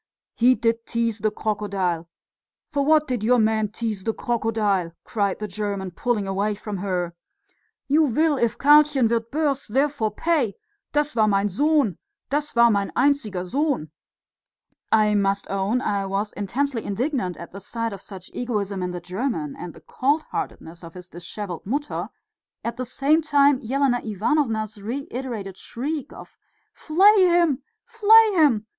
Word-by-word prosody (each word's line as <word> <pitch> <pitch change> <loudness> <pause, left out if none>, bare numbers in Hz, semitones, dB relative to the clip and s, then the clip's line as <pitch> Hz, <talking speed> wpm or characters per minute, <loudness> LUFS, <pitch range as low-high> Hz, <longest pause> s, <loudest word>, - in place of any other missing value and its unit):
"He 250 +2 +4
did 230 -1 -1
tease 230 -2 -1
the 215 +2 +1
crocodile. 200 -6 -2 0.6
For 285 -1 +1
what 305 +1 +4
did 245 -5 -2
your 250 +3 +4
man 220 -1 +2
tease 215 -2 -4
the 225 +1 -1
crocodile?" 215 -7 0
cried 200 -3 -1
the 210 - -4
German, 200 -1 -4
pulling 220 +2 -1
away 200 +2 -1
from 210 0 -6
her. 180 -3 -2 0.7
"You 305 +3 +4
will 305 +5 +2
if 235 -3 0
Karlchen 290 -3 +5
wird 230 0 -1
burst, 285 -5 -1
therefore 270 -3 +1
pay, 250 - 0 0.4
das 295 -2 0
war 215 -2 +4
mein 200 0 +2
Sohn, 285 - +1 0.3
das 295 -1 -1
war 235 0 +6
mein 200 -1 0
einziger 220 -11 +1
Sohn." 270 - -1 1.0
I 215 -1 +4
must 200 -1 +1
own 195 +5 0
I 200 -5 -1
was 200 +2 -2
intensely 240 +4 -2
indignant 220 - -2
at 170 - -9
the 195 - -9
sight 230 +2 -4
of 195 - -8
such 190 -2 -11
egoism 205 -6 -2
in 180 - -2
the 180 -1 -5
German 180 - -3
and 175 - -8
the - - -14
cold 290 +4 0
heartedness 170 +2 -5
of 165 +1 -11
his 180 0 -10
dishevelled 175 +1 -7
Mutter; 285 +6 -2 0.5
at 235 0 -3
the 255 -1 -4
same 290 +6 +2
time 285 -3 +3
Elena 260 +1 +1
Ivanovna's 220 -1 -1
reiterated 235 -4 -5
shriek 285 +4 -5
of - - -13 0.3
"Flay 380 +4 +5
him! 340 -6 +3 0.2
flay 445 0 +6
him!" 285 - +3
225 Hz, 155 wpm, -23 LUFS, 200-280 Hz, 1.0 s, war